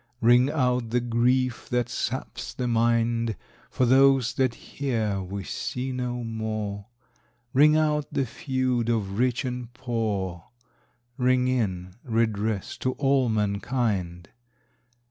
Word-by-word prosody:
Ring 120 +3 +5
out 125 -5 0
the 125 +2 +2
grief 120 +1 +1
that 125 -1 +1
saps - - -4
the 125 - -2
mind, 115 -1 +1 0.3
For 130 - +1
those 135 -1 +5
that 130 -1 +1
here 110 -8 -2
we 95 +1 -5
see 130 +6 -4
no 125 -1 -3
more; 110 -3 -4 0.7
Ring 150 +3 +6
out 150 -2 +1
the 135 - 0
feud 130 -1 -1
of 105 -3 -1
rich 125 +1 +1
and 125 -1 -4
poor, 105 -8 -2 0.7
Ring 125 -1 +2
in 95 -8 -1
redress 110 -3 -1
to 130 - 0
all 135 -3 +2
mankind. 100 -4 -1
120 Hz, 120 wpm, -26 LUFS, 110-130 Hz, 0.7 s, Ring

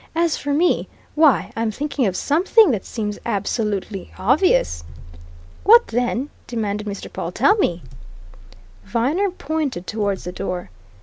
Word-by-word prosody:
"As 335 -1 +2
for 285 - -4
me 330 +5 +2 0.3
why, 305 -3 +3
I'm 225 0 0
thinking 280 +1 -1
of 185 - -2
something 365 - +4
that 215 -6 -2
seems 210 -3 -4
absolutely 200 -1 -2
obvious!" 190 - +2 0.8
"What, 470 +3 +6
then?" 245 +3 -1 0.2
demanded 210 -3 -3
Mr. 200 -1 -5
Pawle. - - -4
"Tell 415 - +4
me!" 175 - 0 1.0
Viner 285 - 0
pointed 305 - -3
towards 205 -3 -2
the 180 - -5
door. 180 - -5
230 Hz, 130 wpm, -21 LUFS, 200-310 Hz, 1.0 s, What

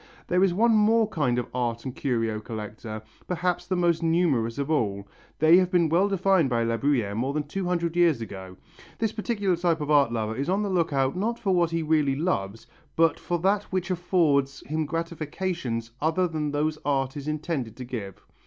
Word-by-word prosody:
There 180 +1 +2
is 195 - +4
one 225 +6 +3
more 220 +1 +4
kind 125 -9 0
of 125 - -1
art 120 -1 -2
and 130 0 -5
curio 115 -5 -1
collector, 110 0 -7 0.2
perhaps 180 0 -1
the 185 - 0
most 175 -2 +2
numerous 160 -9 +1
of 140 +2 -2
all. 100 -9 0 0.3
They 160 +3 +6
have 185 -1 +3
been 175 -3 +2
well 175 +5 +3
defined 190 -5 +2
by 120 -2 +1
La 115 0 0
Bruyère 120 -7 0
more 130 +5 -1
than 150 0 -1
two 185 +6 -4
hundred 170 -2 -1
years 170 -7 +4
ago. 95 -4 -8 0.4
This 225 -2 0
particular 210 -4 -1
type 170 -1 0
of 150 0 -2
art 140 -5 +4
lover 110 -1 -2
is 140 +6 -2
on 195 +3 +1
the 200 - -2
look 170 -3 +1
out 135 0 +1
not 225 +6 -1
for 205 -5 0
what 175 -2 +3
he 165 -1 -1
really 150 -3 +2
loves 115 - -2 0.3
but 165 0 +3
for 175 - -2
that 200 +2 +2
which 185 0 -3
affords 160 -6 +1
him 155 0 -2
gratifications 165 -6 -3
other 165 +4 +2
than 155 -3 -2
those 155 +1 -1
art 135 -1 0
is 145 0 -6
intended 150 -7 -3
to 125 - -6
give. 110 -6 -7
155 Hz, 200 wpm, -26 LUFS, 125-180 Hz, 0.4 s, They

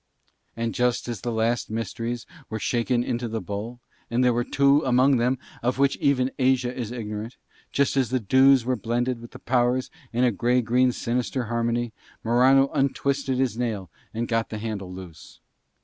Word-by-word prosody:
And 115 0 -2
just 125 -1 0
as 115 -5 -4
the 120 - -2
last 115 +1 0
few 110 - -5
mysteries 115 +2 -3 0.2
were 110 - -3
shaken 120 +2 0
into 120 -1 -2
the 115 0 -3
bowl, 110 +4 -6 0.3
and 120 +2 +1
there 125 -1 +4
were 120 +1 +1
two 140 +3 +3
among 130 +1 +4
them 125 +3 +1 0.2
of 125 +2 0
which 140 0 +3
even 135 -2 +2
Asia 130 -1 +2
is 120 -3 -4
ignorant, 110 0 -5 0.3
just 140 0 +1
as 130 -3 +2
the 130 +1 +1
dews 130 +3 +5
were 130 0 +1
blended 120 +2 -1
with 120 - -10
the - - -11
powers 125 0 +1 0.2
in 120 +2 +1
a 125 - +4
grey 120 +4 +2
green 125 +2 +3
sinister 125 +2 -2
harmony, 120 0 -1 0.3
Morano 130 +4 +4
untwisted 140 -1 0
his 125 -3 0
nail 105 -7 -3 0.2
and 115 +1 -3
got 115 -1 0
the 110 - -5
handle 105 -4 -5
loose. 90 -3 -11
120 Hz, 180 wpm, -25 LUFS, 115-130 Hz, 0.3 s, dews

